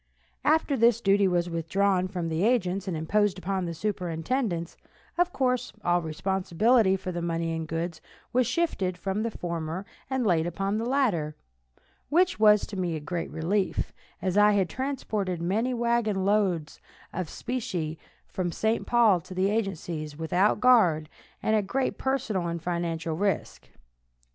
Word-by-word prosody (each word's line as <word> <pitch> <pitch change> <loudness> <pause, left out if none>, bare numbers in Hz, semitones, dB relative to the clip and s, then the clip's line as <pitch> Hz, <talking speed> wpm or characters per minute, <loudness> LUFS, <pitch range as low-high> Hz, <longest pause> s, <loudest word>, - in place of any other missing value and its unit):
After 310 -2 +3
this 235 -2 +4
duty 200 -2 +3
was 175 -1 +1
withdrawn 180 +3 +1
from 180 -3 -3
the 165 +2 -1
agents 200 -5 +1
and 175 -4 -2
imposed 200 +5 +1
upon 185 0 -2
the 170 - -3
superintendents, 180 - -2 0.4
of 355 +1 +2
course 250 -4 0
all 175 0 +2
responsibility 190 +6 +2
for 190 -1 -4
the 175 -1 -3
money 165 -1 -1
and 160 -1 -4
goods 165 +1 -3 0.3
was 250 -1 +3
shifted 250 - 0
from 195 +3 -2
the 230 - 0
former 170 -2 -4 0.2
and 265 -2 0
laid 170 -4 +2
upon 195 +4 -1
the 230 - -2
latter, 195 - +1 0.7
which 355 -2 +3
was 210 -1 +6
to 205 - -8
me 175 -3 -1
a - - -3
great 165 +3 -4
relief, 180 +5 -1 0.3
as 190 +1 +2
I 210 0 +6
had 195 -4 +2
transported 215 - -2
many 205 +9 0
wagon 235 -5 +1
loads 195 -7 +1 0.3
of 175 -3 -3
specie 175 -11 -3 0.3
from 180 -2 -2
St. 220 +6 0
Paul 225 -7 +4
to 185 - -10
the 190 +2 +2
agencies 170 -8 -3
without 180 +5 +2
guard, 180 -12 +4 0.3
and 220 - +2
at 205 -3 0
great 260 +5 -1
personal 215 -9 -1
and 170 0 -3
financial 165 -1 -2
risk. 200 +3 -2
190 Hz, 155 wpm, -27 LUFS, 170-220 Hz, 0.7 s, was